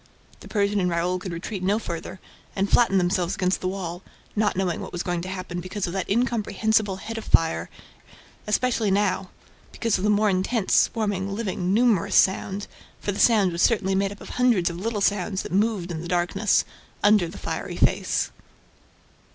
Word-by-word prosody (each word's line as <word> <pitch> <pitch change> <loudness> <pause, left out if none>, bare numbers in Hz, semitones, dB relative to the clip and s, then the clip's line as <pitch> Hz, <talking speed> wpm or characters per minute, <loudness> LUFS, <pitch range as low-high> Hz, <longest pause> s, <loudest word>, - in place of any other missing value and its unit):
The - - -12
Persian 205 -1 +1
and 180 -1 +1
Raoul 175 +2 0
could 180 0 -6
retreat 180 +4 -5
no 195 +3 +2
farther 180 -2 -6 0.4
and 195 +1 +1
flattened 195 -3 +4
themselves 180 0 0
against 185 -1 0
the 185 - -1
wall, 180 -2 -4 0.3
not 210 -1 +1
knowing 180 -3 -1
what - - -7
was 175 - -3
going 175 -1 -2
to 185 - -6
happen 185 -2 -5
because 185 +2 -4
of 175 - -5
that 195 - -3
incomprehensible 220 -2 +1
head 225 +4 -6
of - - -8
fire, 85 - +2
and - - -22 0.3
especially 230 0 +1
now, 200 +2 +1 0.4
because 230 -5 0
of - - -4
the 210 - +2
more 210 +1 +3
intense, 195 +2 0
swarming, 200 -3 +1
living, 190 -4 -2
"numerous" 210 -4 +2
sound, 195 +1 +2 0.3
for 205 - -2
the 200 - -5
sound 210 -6 +4
was 170 +1 -2
certainly 195 -3 +2
made 195 +1 +1
up 205 - -11
of - - -10
hundreds 235 -9 +2
of 170 - -7
little 210 +2 -2
sounds 195 -1 0
that - - -8
moved 200 -2 0
in 160 -2 -4
the 175 - -6
darkness, 180 +4 +1 0.4
under 205 -4 +5
the 170 - -9
fiery - - -4
face. - - +1
195 Hz, 190 wpm, -24 LUFS, 180-210 Hz, 0.4 s, under